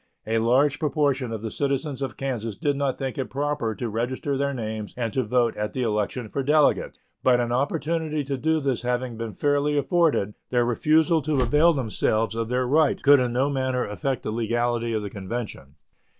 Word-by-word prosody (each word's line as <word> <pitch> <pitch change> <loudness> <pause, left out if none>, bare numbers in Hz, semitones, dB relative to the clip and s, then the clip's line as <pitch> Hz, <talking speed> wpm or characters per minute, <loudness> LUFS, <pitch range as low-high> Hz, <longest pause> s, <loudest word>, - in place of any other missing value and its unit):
A 115 +1 +1
large 130 +6 +3
proportion 145 -5 0
of 110 -1 -5
the 110 - -4
citizens 140 +1 -2
of 130 -4 -4
Kansas 115 -6 -3
did 145 -3 0
not 140 -2 -1
think 135 0 -4
proper 140 -5 -2
to 120 - -3
register 125 +5 -2
their 140 +1 0
names 110 -4 -5
and 115 -4 -2
to 130 - +1
vote 120 0 +1
at 105 0 -3
the 130 - -1
election 110 +2 -1
for 135 - -3
delegates; 150 +2 +2 0.2
but 125 -1 +4
an 120 -1 -1
opportunity 155 +3 -1
to 140 0 -3
do 160 +4 +1
this 135 -4 -1
having 125 0 -2
been 115 -1 -5
fairly 145 0 +1
afforded, 145 - +2 0.2
their 120 -1 +2
refusal 155 +7 +3
to 145 -2 0
avail 150 +7 +4
themselves 115 -4 0
of 115 0 -3
their 125 +1 +1
right 150 +3 +2
could 140 0 +7
in 125 -1 0
no 130 +3 +2
manner 130 -2 0
affect 130 +5 -3
the - - -3
legality 120 +1 0
of 110 -2 -1
the 100 - -4
convention. 100 - -6
130 Hz, 195 wpm, -25 LUFS, 115-145 Hz, 0.2 s, could